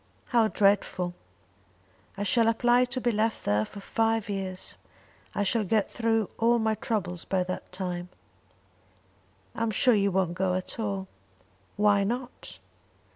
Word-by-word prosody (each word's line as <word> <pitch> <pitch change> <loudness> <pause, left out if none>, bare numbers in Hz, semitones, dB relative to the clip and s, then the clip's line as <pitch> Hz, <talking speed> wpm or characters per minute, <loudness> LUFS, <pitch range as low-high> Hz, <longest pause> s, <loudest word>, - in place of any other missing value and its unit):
"How 235 -3 +4
dreadful!" 195 -4 +1 1.0
"I 205 - -2
shall 225 +3 +3
apply 240 +2 +4
to 250 +1 -4
be 240 -1 +1
left 220 +1 -1
there 105 +1 +2
for 200 - -10
five 225 +1 0
years. 190 -2 -4 0.6
I 205 - +1
shall 215 +3 +1
get 210 +1 +1
through 225 -3 0
all 235 +1 +4
my 220 -1 +1
troubles 180 -6 -3
by 185 -1 0
that 185 0 -6
time." 180 -1 -4 1.4
"I - - -6
am 230 - +1
sure 235 +4 +4
you 200 -2 +2
won't 185 -2 +1
go 185 0 0
at 185 +5 -5
all." 200 -3 -2 0.7
"Why 205 -1 +4
not?" 245 - -5
205 Hz, 145 wpm, -28 LUFS, 185-225 Hz, 1.4 s, How